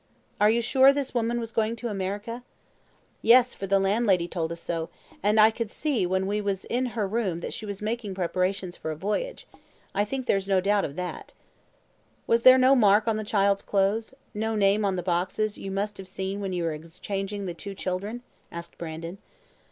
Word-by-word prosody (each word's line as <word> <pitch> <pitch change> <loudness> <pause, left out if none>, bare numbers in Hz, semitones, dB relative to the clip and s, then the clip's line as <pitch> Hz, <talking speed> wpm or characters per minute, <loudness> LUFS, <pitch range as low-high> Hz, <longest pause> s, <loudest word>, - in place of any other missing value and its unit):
"Are 210 - +5
you 235 +2 +2
sure 265 +3 +6
this 280 -1 -2
woman 235 0 0
was 230 -1 -5
going 225 0 0
to 240 +1 -5
America?" 205 +3 -4 0.8
"Yes, 250 +2 +6
for 195 - -6
the 195 +1 +4
landlady 195 -2 +2
told 165 -2 -3
us 170 - -5
so, 165 -1 -3 0.3
and 210 +2 +3
I 215 +1 +7
could 225 -1 -4
see 250 - -1
when 190 +1 0
we 205 +2 -1
was 200 -2 -2
in 250 +2 0
her 210 -3 +1
room 195 -5 -1
that - - -5
she 215 - -6
was 200 0 -5
making 215 -3 -3
preparations 185 0 -1
for - - -6
a 155 - -3
voyage. 210 - -3 0.5
I 200 - +2
think 260 +4 -4
there's 195 -4 +1
no 195 -1 +3
doubt 200 +1 +2
of 140 - -6
that." 180 +1 -6 0.9
"Was 230 0 +3
there 255 +2 +9
no 260 +1 +6
mark 210 -2 +4
on 220 -1 +2
the 215 - -3
child's 200 -1 +2
clothes? 210 +5 0 0.2
no 220 +1 -1
name 205 0 +3
on 195 -1 +1
the 180 - -3
boxes 185 +4 -1
you 195 - -6
must 205 +2 -2
have 190 - -8
seen 190 +1 -4
when 195 -2 -3
you 175 -2 -2
were 165 -1 0
exchanging 195 +5 -5
the 175 - -3
two 195 +4 -8
children?" 200 +6 -4 0.3
asked 170 0 -9
Brandon. 165 +3 -6
200 Hz, 205 wpm, -26 LUFS, 185-225 Hz, 0.9 s, there